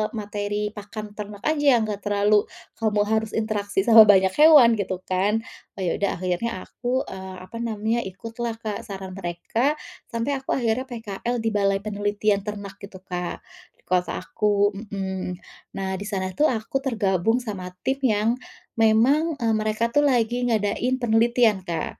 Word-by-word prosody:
materi 205 0 -3
pakan 210 0 -8
ternak 205 -1 -7
aja 290 -4 +4
yang 225 - +1
enggak 210 -2 -4
terlalu, 205 0 +3 0.3
kamu 215 -2 +1
harus 220 0 0
interaksi 205 -3 -1
sama 225 -2 +10
banyak 190 -2 +5
hewan," 295 -7 +8
gitu, 185 -2 -2
kan. 200 +4 0 0.3
Oh - - -5
ya 170 - +1
udah 200 - +1
akhirnya 185 +3 -2
aku, 250 +2 -2
eee, 190 0 -7
apa 210 +5 -9
namanya, 225 0 -1
ikutlah, 230 +4 -5
Kak, 215 -2 -3
saran 190 -2 -7
mereka, 195 - -1 0.4
sampai 230 +3 -1
aku 265 - -15
akhirnya 240 +1 0
PKL 230 0 -4
di 225 - +2
balai 195 -1 +2
penelitian 205 0 0
ternak 205 -2 -6
gitu, 200 -1 -10
Kak, 180 -1 -5 0.3
di - - -32
kota 180 -1 0
aku 205 -1 +1
mhm. 190 -3 -5 0.4
Nah 190 -1 -3
di - - -5
sana 190 -3 -2
tuh 305 - +5
aku 230 +3 -2
tergabung 220 -2 +1
sama 195 -6 -5 0.2
tim 270 +1 0
yang 215 -3 +2 0.5
memang, 260 +9 +4
e - - 0
mereka 215 +2 0
itu - - +4
lagi 245 -5 +2
ngadain 225 +3 +1
penelitian, 230 -2 +3
Kak. 170 -1 -3
210 Hz, 160 wpm, -24 LUFS, 195-230 Hz, 0.5 s, sama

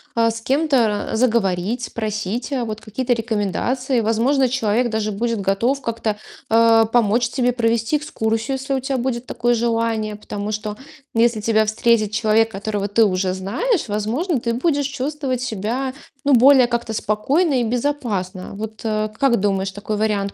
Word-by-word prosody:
а, 230 -1 +3
с 225 - -6
кем-то 270 -3 +2 0.2
ра - - -1
заговорить, 225 -1 +1
спросить, 215 +2 -3
э, 250 -3 0
вот 215 -1 -4
какие-то 235 +4 -3
рекомендации. 235 +3 -1
Возможно, 240 +5 +2
человек 240 -1 +1
даже 220 -1 -1
будет 225 +1 -1
готов 230 +9 0
как-то, 225 -3 -2 0.3
э, 225 0 +5
помочь 235 0 +2
тебе 250 -1 +1
провести 230 +3 +1
экскурсию, 225 -3 -2
если 270 +1 -3
у 265 - +1
тя 265 +1 -2
будет 245 -1 -2
такое 240 0 0
желание. 230 -2 0
Потому 205 0 -5
что 210 0 -4 0.4
если 230 -1 +2
тебя 220 0 +2
встретит 215 0 +2
человек, 220 +1 +2
которого 205 0 -3
ты 215 +3 +3
уже 185 -1 0
знаешь, 240 - -1
возможно, 240 - -1
ты 235 0 -1
будешь 285 +3 0
чувствовать 275 -2 -3
себя, 250 +3 -2 0.3
ну, 285 - +3
более 260 +1 +7
как-то 235 -2 -2
спокойно 265 - +1
и - - +1
безопасно. 225 -7 -2
Вот, 215 +1 -7
а, 215 -1 0
как 235 +2 +1
думаешь, 195 -1 0
такой 205 +2 -4
вариант 205 -2 0
230 Hz, 160 wpm, -20 LUFS, 215-255 Hz, 0.4 s, более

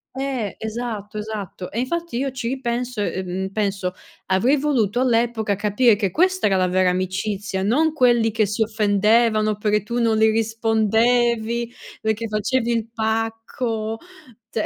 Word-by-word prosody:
Eh, 265 -6 -3
esatto, 220 -2 -5
esatto. 210 -4 -6
E 230 - -3
infatti 335 +1 -2
io 270 +1 -1
ci 250 -3 -4
ripenso, 245 -2 -2
ehm, 190 -1 -3
penso, 195 -3 -1 0.3
avrei 235 +10 +3
voluto 250 -6 +1
all'epoca 230 -4 +1
capire 210 +3 +3
che 200 -2 -1
questa 370 - +2
era 195 - +2
la 185 0 +2
vera 185 0 +2
amicizia, 190 +2 -2
non 300 +10 +2
quelli 240 -5 +3
che 215 -2 +1
si 210 +3 0
offendevano 215 0 +2
perché 210 -1 +1
tu 235 +3 -3
non 225 -2 +2
li 220 0 +4
rispondevi, 225 +1 +1 0.3
perché 220 +1 -1
facevi 230 +3 0
il 230 -1 -1
pacco, 225 0 -2 0.5
cioè 215 - -2
220 Hz, 145 wpm, -22 LUFS, 210-240 Hz, 0.5 s, li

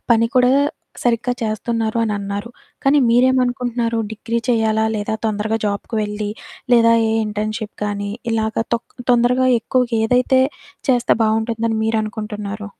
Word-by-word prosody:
పని 230 0 +5
కూడా 250 0 +5 0.5
సరిగ్గా 240 +1 +1
చేస్తన్నారు 225 +1 -1
అనన్నారు, 205 0 -3 0.3
కానీ 280 +2 +4
మీరేమనుకుంటున్నారు 245 -1 +2
డిగ్రీ 225 +1 -3
చెయ్యాలా, 220 -2 +2
లేదా 210 +1 -2
తొందరగా 215 0 0
జాబ్‌కి 200 +3 -3
వెళ్లి, 210 0 -3 0.4
లేదా 230 -1 +6 0.2
ఏ - - 0 0.2
ఇంటర్న్‌షిప్ 215 +1 -4
కానీ, 205 0 -3 0.2
ఇలాగ 220 -1 -1 0.2
తొక్ 230 - -6 0.2
తొందరగా 250 +2 +3
ఎక్కువుగేదైతే 250 +2 +2 0.5
చేస్తే 245 -1 +3
బావుంటుందని 225 0 0
మీరనుకుంటున్నారు? 210 -1 -3
225 Hz, 115 wpm, -19 LUFS, 215-240 Hz, 0.5 s, లేదా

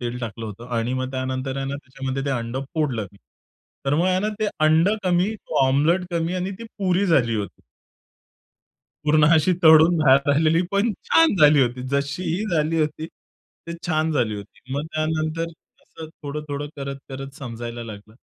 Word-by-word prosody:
तेल 120 0 -4
टाकलं 115 0 -5
होतं 110 +3 -9
आणि 120 +3 -1
मग 130 0 -2
त्यानंतर 130 +1 -3
आहे 135 - -3
ना, 140 +1 -3
त्याच्यामध्ये 135 0 -5
ते - - 0
अंडं 120 +3 -4
फोडलं 130 -10 -1
मी. 100 - -20 0.7
तर 135 - +2
मग 170 +4 +2
आहे 185 0 +2
ना, 210 - 0
ते 215 - +1 0.2
अंडं 165 +7 +4
कमी, 180 +4 +2
तो 150 -9 0
ओमलेट 165 +7 +2
कमी 170 +1 -1
आणि 185 +1 -2
ती 230 - -8
पुरी 190 0 +1
झाली 125 -9 +3
होती. 105 -2 -5 1.4
पूर्ण 150 0 +4
अशी 160 +3 +3
तळून 160 +1 +7
बाहेर 140 -1 +4
आलेली 160 +3 +3
पण 205 +3 +2
छान 330 -5 +4
झाली 150 -4 +6
होती. 125 0 -2
जशी 140 +4 -1
ही 180 +6 -1
झाली 160 +1 +1
होती 155 +1 -2 0.6
ते 170 - -5
छान 160 -1 +1
झाली 120 -7 0
होती. 100 -1 -11
मग 145 - -2
त्यानंतर 155 +1 -1 0.4
असं 160 -1 -11
थोडं-थोडं, 145 0 -4
करत-करत 135 -1 -7
समजायला 120 -2 -6
लागलं. 105 0 -11
145 Hz, 170 wpm, -23 LUFS, 130-165 Hz, 1.4 s, तळून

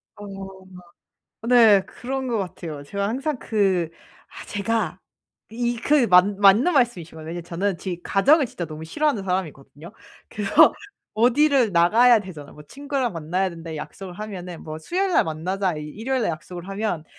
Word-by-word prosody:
어. 205 - -10 1.2
네 225 -5 +6
그런 265 +1 -5
것 235 -2 0
같아요. 165 -6 -6
제가 200 +7 -3
항상 270 +5 -2
그 190 -8 0 0.4
아 - - -9
제가 205 -3 -2 0.5
이 240 +1 -2
그 275 +2 +3
맞 180 -2 +7
맞는 205 - +4
말씀이신 240 - +1
것 - - -13
같아요. 155 - -10
왜냐하면 170 0 -6
저는 180 +2 -2
지 175 -2 -5
과정을 275 +9 +3
진짜 180 -6 -6
너무 155 -1 -9
싫어하는 275 - -1
사람이거든요. 170 -2 -5 0.4
그래서 205 -1 +4 0.4
어디를 250 0 +3
나가야 225 +8 +5
되잖아요. 160 -8 -11
뭐 150 - -13
친구랑 275 - -3
만나야 175 +4 -2
된다 165 -1 -8
약속을 180 +4 -8
하면은 180 -4 -7
뭐 155 0 -7
수요일 375 - -1
날 - - +5
만나자 180 +3 -2
이 150 - -6
일요일 245 - -2
날 - - 0
약속을 175 +2 -8
하면 195 -5 -3
195 Hz, 345 characters per minute, -23 LUFS, 170-240 Hz, 1.2 s, 맞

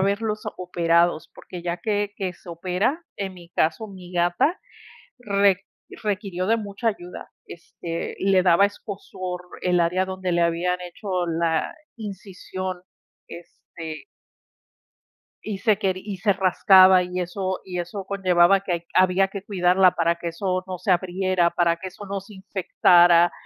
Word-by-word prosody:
verlos 210 +2 0
operados, 170 -2 +1
porque, 180 - -9
ya 175 0 -3
que 205 -1 -1
que 190 -2 -3
se 175 - -18
opera, 185 - -1
en 190 -2 -4
mi 175 -1 -14
caso, 165 +7 0
mi 185 -2 -12
gata 175 - +1 0.6
re 200 -4 +2 0.4
requirió 195 -3 -2
de 225 +3 +2
mucha 210 +2 -2
ayuda, 180 -4 -8 0.2
este, 170 0 -7
le 190 -1 +3
daba 180 +2 +5
escozor 185 -3 -7 0.2
el 180 -1 +2
área 180 +2 +1
donde 185 -1 -3
le 175 0 +2
habían 175 +2 +1
hecho 180 0 -3
la 165 -1 0 0.2
incisión, 190 -3 -6 0.5
este 165 - -10 1.4
y 210 -3 -3
se 215 +1 +2
queri 190 -3 -1
y 205 -2 -5
se 200 +2 +2
rascaba, 185 0 +6
y 180 0 -4
eso 185 +1 -3
y 180 -1 -5
eso 185 +3 -5
conllevaba 185 -1 +4
a - - -3
que 190 -2 -3
hay 170 - -1
que 170 - -34
había 185 +1 +4
que 195 -1 -7
cuidarla 185 -1 +3
para 170 0 +1
que 170 0 -5
eso 185 +2 -2
no 185 -1 -5
se 185 +2 -2
abriera, 185 0 +1
para 170 -1 +2
que 185 +3 -7
eso 200 +2 -11
no 195 0 -3
se 205 +1 -14
infectara. 175 -3 +4
185 Hz, 155 wpm, -23 LUFS, 175-195 Hz, 1.4 s, rascaba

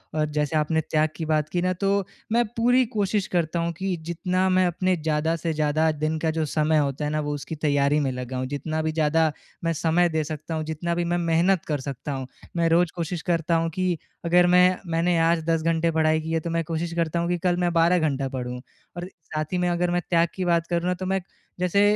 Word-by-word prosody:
और 155 - +2
जैसे 150 +1 -1
आपने 160 +1 +1
त्याग 155 0 +1
की 160 - -4
बात 155 -1 0
की 175 - -1
न 185 0 +1
तो 195 - +2 0.4
मैं 240 +1 +4
पूरी 245 +2 +4
कोशिश 205 -1 0
करता 170 -1 0
हूँ 170 0 0
कि 190 -1 -1
जितना 185 +2 0
मैं 185 0 +3
अपने 185 +2 +1
ज़्यादा 160 +1 0
से 165 0 -2
ज़्यादा 155 +1 +1
दिन 155 +1 -2
का 160 0 0
जो 160 -1 -1
समय 155 +1 +1
होता 145 0 0
है 150 - -1
न 155 - 0
वो 145 - -2
उसकी 150 +3 -6
तैयारी 145 -1 +2
में 135 -3 0
लगाऊँ, 125 0 -4
जितना 155 +3 -3
भी 160 0 -1
ज़्यादा 160 0 +2 0.3
मैं 165 0 +1
समय 170 +3 +2
दे 160 -1 0
सकता 155 +1 -5
हूँ, 155 - -2
जितना 170 +2 -2
भी 175 - 0
मैं 175 +1 0
मेहनत 170 +1 +2
कर 150 -3 -1
सकता 140 +1 -5
हूँ। 130 -1 -4 0.3
मैं 165 -1 +2
रोज 170 0 +3
कोशिश 170 0 -3
करता 170 -1 0
हूँ 165 0 +1
कि 185 -2 0 0.3
अगर 175 +1 +5
मैं 180 +1 +5
मैंने 170 +1 +2
आज 165 0 +2
10 165 -1 +2
घंटे 165 0 +1
पढ़ाई 155 0 +2
की 160 +1 -5
है 165 - +1
तो 170 - -5
मैं 165 0 0
कोशिश 165 +1 -3
करता 170 0 0
हूँ 170 +1 -1
कि 175 - +1
कल 175 0 +1
मैं 175 -1 +1
12 170 +2 +4
घंटा 140 -4 0
पढ़ूँ। 125 -1 -5 0.4
और 175 +1 -4 0.2
साथ 155 0 -3
ही 180 - +1
में 180 0 +1
अगर 175 0 0
मैं 175 0 +1
त्याग 170 -1 +3
की 185 -1 -2
बात 170 -1 +2
करूँ 175 +1 0
न - - +2
तो 185 - -3
मैं 190 0 0 0.4
जैसे 180 +3 +2
165 Hz, 240 wpm, -24 LUFS, 155-175 Hz, 0.4 s, अगर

